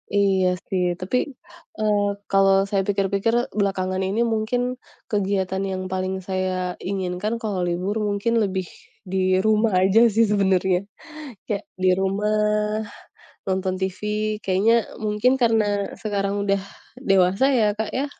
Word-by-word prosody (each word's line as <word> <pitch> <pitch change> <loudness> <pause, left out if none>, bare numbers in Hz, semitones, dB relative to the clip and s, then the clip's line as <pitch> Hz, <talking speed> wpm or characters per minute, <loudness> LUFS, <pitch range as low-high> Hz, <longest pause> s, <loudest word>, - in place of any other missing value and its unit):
Iya 195 -2 +3 0.2
sih, 185 -1 +1 0.2
tapi, 185 +7 -1 0.6
eee, 210 -1 +2 0.2
kalau 195 0 +5
saya 195 -1 +1
pikir-pikir 200 +2 0 0.3
belakangan 185 -1 0
ini 220 +5 +1
mungkin 225 +2 0 0.5
kegiatan 190 -2 0
yang 185 - -3
paling 190 0 -2
saya 185 -1 -2
inginkan 190 +2 -3
kalau 205 -4 -2
libur 180 +4 -2
mungkin 205 +3 0
lebih 190 -2 -1 0.5
di 190 - 0 0.2
rumah 220 0 +3
aja 195 +4 +4 0.2
sih 230 - +5
sebenernya. 190 -2 +2 0.7
Kayak 205 -1 -3 0.2
di 185 - +5
rumah 195 +2 0 1.2
nonton 185 0 0
TV 190 -1 -3 0.4
kayaknya 195 +5 +3 0.3
mungkin 210 +4 +2
karena 225 -2 +3 0.4
sekarang 200 -2 -1
udah 195 -1 +1 0.5
dewasa 190 +4 +4 0.2
ya, 215 - +4
Kak, 220 - -1
ya, 280 - 0
195 Hz, 125 wpm, -23 LUFS, 190-210 Hz, 1.2 s, kalau